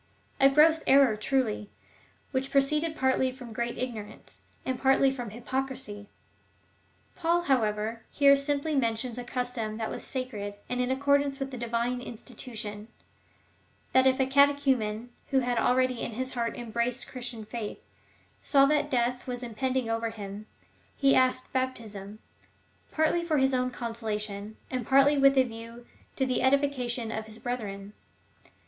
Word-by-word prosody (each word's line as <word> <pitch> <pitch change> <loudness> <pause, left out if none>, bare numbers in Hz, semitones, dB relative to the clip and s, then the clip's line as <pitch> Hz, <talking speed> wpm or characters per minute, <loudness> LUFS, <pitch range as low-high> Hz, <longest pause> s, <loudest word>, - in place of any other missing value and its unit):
^ - - -36 0.4
A 275 - +9
gross 315 +3 +5
error 270 -4 +6
truly, 215 -2 -1 0.6
which 265 0 -1
proceeded 300 +3 +2
partly 260 -1 +2
from 250 -3 -10
great 235 +1 -3
ignorance, 230 -5 -6 0.2
and 260 -1 -2
partly 270 0 +4
from 245 -4 -5
hypocrisy! 240 -3 -4 1.1
Paul, 345 0 +1
how 270 -6 +3
ever, 215 +1 -2
here 280 -1 +5
simj^ly 280 +1 +1
mentions 230 0 -1
a - - -4
custom 245 -3 -3
that 220 -1 -3
was - - -5
sacred, 215 -6 -4
and 250 0 -1
in 250 - 0
accordance 280 +1 +2
with 270 0 -3
the 255 - -6
Divine 235 +1 -1
institution 220 -3 -7 0.5
— - - -36
that 260 0 +5
if 260 0 +3
a 265 - +4
cate 280 +2 +5
chumen, 240 -5 0 0.2
who 265 -1 +3
had 245 -1 0
already 255 -1 +2
in 230 - -3
his 260 +3 -3
heart 235 -2 -2
embraced 235 +1 -1
the - - -14
Chris 245 -2 -4
tian 225 -3 -8
faith,^ 215 -1 -6 0.6
saw 275 -1 +5
that 295 0 +2
death 245 -1 0
was 250 0 -4
impending 255 +1 -1
over 225 0 -1
him, 210 -1 -8 0.5
he 275 -1 +4
asked 255 0 +2
baptism, 220 -6 -3 0.7
partly 315 +2 +2
for 320 -3 +1
his 265 0 +3
own 255 0 +1
consolation, 215 -3 -4
and 255 -3 -3
partly 275 +2 +5
with 275 0 +5
a 260 - +7
view 230 0 -9 0.3
to 265 - +1
the 255 -1 0
edification 260 -4 +1
of 220 0 -4
his 220 0 -10
brethren. 205 -5 -5
250 Hz, 160 wpm, -28 LUFS, 225-270 Hz, 1.1 s, A